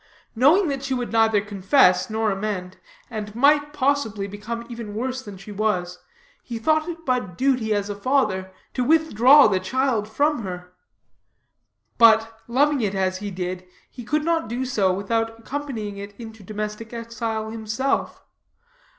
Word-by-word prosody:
Knowing 310 Hz, -, +5 dB
that 275 Hz, -2 st, -2 dB
she 270 Hz, -1 st, -1 dB
would 245 Hz, -1 st, -3 dB
neither 225 Hz, -2 st, +4 dB
confess 195 Hz, -1 st, +3 dB
nor 220 Hz, 0 st, 0 dB
amend, 195 Hz, -2 st, -4 dB, 0.3 s
and 210 Hz, -2 st, -6 dB
might, 290 Hz, +3 st, +4 dB
possibly, 270 Hz, -8 st, 0 dB
become 215 Hz, +4 st, -6 dB
even 230 Hz, -4 st, -7 dB
worse 255 Hz, +3 st, -3 dB
than 205 Hz, -6 st, -10 dB
she 195 Hz, +3 st, -11 dB
was, 185 Hz, -4 st, -1 dB, 0.4 s
he 235 Hz, -, -6 dB
thought 310 Hz, +8 st, +1 dB
it 330 Hz, -1 st, -8 dB
but 245 Hz, -9 st, -1 dB
duty 255 Hz, -5 st, +1 dB
as 205 Hz, -1 st, 0 dB
a 205 Hz, -, -3 dB
father, 200 Hz, -4 st, 0 dB, 0.2 s
to 250 Hz, -, 0 dB
withdraw 290 Hz, -2 st, +6 dB
the 195 Hz, -3 st, +3 dB
child 230 Hz, +1 st, 0 dB
from 290 Hz, +3 st, +1 dB
her; 180 Hz, -2 st, -7 dB, 1.3 s
but, 225 Hz, -1 st, +5 dB
loving 280 Hz, +3 st, +2 dB
it 200 Hz, -3 st, -1 dB
as 185 Hz, -1 st, 0 dB
he 205 Hz, 0 st, -4 dB
did, 180 Hz, -1 st, -4 dB, 0.3 s
he 245 Hz, -, -9 dB
could 300 Hz, +5 st, -1 dB
not 330 Hz, -6 st, 0 dB
do 245 Hz, +3 st, -2 dB
so 205 Hz, -7 st, +1 dB
without 225 Hz, +4 st, -1 dB
accompanying 230 Hz, -5 st, -5 dB
it 200 Hz, 0 st, -8 dB
into 225 Hz, -2 st, -10 dB
domestic 210 Hz, +3 st, -6 dB
exile 230 Hz, -1 st, -4 dB
himself. 225 Hz, +4 st, -2 dB
225 Hz, 155 wpm, -23 LUFS, 205-260 Hz, 1.3 s, withdraw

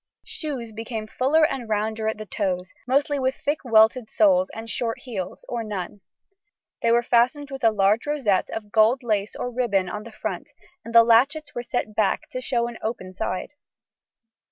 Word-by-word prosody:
Shoes 265 Hz, -8 st, -5 dB
became 225 Hz, 0 st, -5 dB
fuller 275 Hz, +8 st, +3 dB
and 250 Hz, -7 st, -3 dB
rounder 220 Hz, +1 st, -1 dB
at 220 Hz, -, -1 dB
the 215 Hz, -, -7 dB
toes, 180 Hz, -2 st, -3 dB
mostly 280 Hz, +2 st, +2 dB
with 260 Hz, 0 st, 0 dB
thick 295 Hz, +2 st, -1 dB
welted 225 Hz, 0 st, +4 dB
soles 280 Hz, -3 st, +3 dB
and 225 Hz, +1 st, -8 dB
short 230 Hz, 0 st, -2 dB
heels, 200 Hz, -8 st, -6 dB
or 235 Hz, -2 st, -3 dB
none. 205 Hz, -2 st, -5 dB, 0.8 s
They 230 Hz, -, +3 dB
were 240 Hz, +1 st, +4 dB
fastened 255 Hz, +5 st, +2 dB
with 270 Hz, -1 st, -7 dB
a 225 Hz, -, +7 dB
large 210 Hz, +3 st, +2 dB
rosette 255 Hz, -11 st, +1 dB
of 210 Hz, -2 st, -6 dB
gold 225 Hz, +4 st, +4 dB
lace 210 Hz, -3 st, -1 dB
or 245 Hz, -, -4 dB
ribbon 210 Hz, -7 st, 0 dB
on 210 Hz, +3 st, -5 dB
the 230 Hz, +2 st, -11 dB
front, 215 Hz, -, -5 dB, 0.3 s
and 230 Hz, 0 st, -8 dB
the 230 Hz, -, +10 dB
latchets 270 Hz, +7 st, +3 dB
were 240 Hz, -, -3 dB
set 240 Hz, -2 st, -3 dB
back 210 Hz, -2 st, 0 dB
to 255 Hz, -, -4 dB
show 240 Hz, -2 st, 0 dB
an 235 Hz, -1 st, -8 dB
open 185 Hz, -5 st, -4 dB
side. 185 Hz, +3 st, -3 dB
230 Hz, 180 wpm, -24 LUFS, 215-255 Hz, 0.8 s, the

